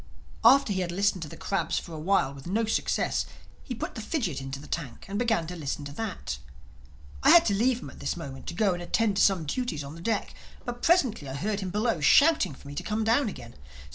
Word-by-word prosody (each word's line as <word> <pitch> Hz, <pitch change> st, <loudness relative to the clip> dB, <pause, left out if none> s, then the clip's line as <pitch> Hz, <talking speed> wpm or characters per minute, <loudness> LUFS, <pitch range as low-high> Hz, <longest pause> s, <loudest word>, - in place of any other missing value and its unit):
After 275 Hz, -6 st, +6 dB
he 190 Hz, -, -1 dB
had 175 Hz, -1 st, -2 dB
listened 195 Hz, 0 st, +1 dB
to 160 Hz, -, -4 dB
the -, -, -10 dB
crabs 170 Hz, -4 st, -1 dB
for 170 Hz, -, -5 dB
a 155 Hz, -, -6 dB
while 160 Hz, -5 st, +2 dB
with 140 Hz, +3 st, -11 dB
no 220 Hz, +5 st, +1 dB
success, 220 Hz, -, 0 dB, 0.4 s
he 250 Hz, -, -5 dB
put -, -, -5 dB
the 225 Hz, -, -6 dB
fidgit 215 Hz, -, -2 dB
into 135 Hz, +1 st, -5 dB
the 145 Hz, -, -11 dB
tank 135 Hz, -8 st, -5 dB
and 200 Hz, +1 st, -3 dB
began 225 Hz, -8 st, +1 dB
to 180 Hz, +2 st, -6 dB
listen 145 Hz, -2 st, -4 dB
to 140 Hz, -, -7 dB
that. 180 Hz, -, -4 dB, 0.8 s
I -, -, +5 dB
had 340 Hz, -, +8 dB
to 205 Hz, -, +2 dB
leave 240 Hz, +4 st, +1 dB
him -, -, -8 dB
at -, -, -15 dB
this -, -, -2 dB
moment 140 Hz, -5 st, -8 dB
to -, -, -4 dB
go 200 Hz, -1 st, +2 dB
and 175 Hz, -, -5 dB
attend 205 Hz, +3 st, +1 dB
to -, -, +3 dB
some 185 Hz, -5 st, +3 dB
duties 165 Hz, -, -2 dB
on 140 Hz, +1 st, -8 dB
the 165 Hz, -, -10 dB
deck. 215 Hz, +2 st, -1 dB, 0.3 s
But 245 Hz, 0 st, -5 dB
presently 255 Hz, -, +2 dB
I 130 Hz, -, -5 dB
heard 205 Hz, +7 st, -1 dB
him 190 Hz, -2 st, -3 dB
below 210 Hz, -2 st, 0 dB
shouting 245 Hz, -, +5 dB
for 140 Hz, -, -14 dB
me 140 Hz, -, -7 dB
to -, -, -3 dB
come 215 Hz, +1 st, -1 dB
down 230 Hz, +3 st, +3 dB
again. 120 Hz, -11 st, -10 dB
195 Hz, 245 wpm, -28 LUFS, 155-225 Hz, 0.8 s, had